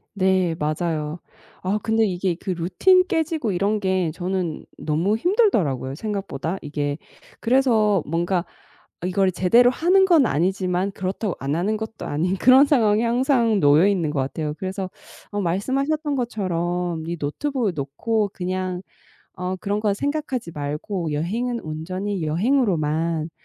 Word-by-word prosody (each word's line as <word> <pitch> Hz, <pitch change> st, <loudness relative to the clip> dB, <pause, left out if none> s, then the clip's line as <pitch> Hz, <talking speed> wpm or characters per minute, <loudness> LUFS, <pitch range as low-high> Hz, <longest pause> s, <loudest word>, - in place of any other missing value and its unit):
네. 185 Hz, -3 st, +2 dB
맞아요. 155 Hz, +1 st, -2 dB, 0.4 s
아우 195 Hz, +3 st, 0 dB
근데 225 Hz, 0 st, +2 dB
이게 180 Hz, -2 st, -1 dB
그 185 Hz, -, -8 dB
루틴 185 Hz, -, +3 dB
깨지고 320 Hz, -, -1 dB
이런 200 Hz, +4 st, 0 dB
게 185 Hz, -4 st, 0 dB
저는 180 Hz, -2 st, -3 dB
너무 165 Hz, +7 st, 0 dB
힘들더라고요 220 Hz, -, +1 dB
생각보다 195 Hz, -4 st, -3 dB
이게. 145 Hz, -1 st, -3 dB, 0.4 s
그래서 225 Hz, -, +3 dB
뭔가 170 Hz, +3 st, 0 dB, 0.6 s
이걸 185 Hz, +1 st, +2 dB
제대로 235 Hz, +8 st, +4 dB
하는 370 Hz, +7 st, +4 dB
건 325 Hz, -9 st, +5 dB
아니지만 185 Hz, +3 st, 0 dB
그렇다고 190 Hz, +1 st, -3 dB
안 140 Hz, +3 st, -2 dB
하는 195 Hz, +6 st, 0 dB
것도 220 Hz, +1 st, -6 dB
아닌 180 Hz, +6 st, -1 dB
그런 260 Hz, +5 st, +7 dB
상황에 225 Hz, -6 st, +3 dB
항상 235 Hz, -2 st, +2 dB
놓여 150 Hz, +6 st, +5 dB
있는 175 Hz, -7 st, +1 dB
것 145 Hz, -, -2 dB
같아요. 150 Hz, +3 st, -2 dB
그래서 190 Hz, 0 st, -4 dB, 0.4 s
어 205 Hz, -, -2 dB
말씀하셨던 275 Hz, -, 0 dB
것처럼 180 Hz, -8 st, -2 dB
'이 170 Hz, 0 st, -3 dB
노트북을 225 Hz, -, -1 dB
놓고 200 Hz, +10 st, -1 dB
그냥 185 Hz, 0 st, -3 dB, 0.5 s
어 180 Hz, 0 st, -3 dB
그런 200 Hz, +2 st, -2 dB
거 210 Hz, -2 st, +1 dB
생각하지 280 Hz, -, -3 dB
말고 150 Hz, +4 st, -3 dB
여행은 230 Hz, +11 st, -1 dB
온전히 185 Hz, +4 st, -4 dB
여행으로만 165 Hz, -, +1 dB
190 Hz, 305 characters per minute, -23 LUFS, 165-225 Hz, 0.6 s, 그런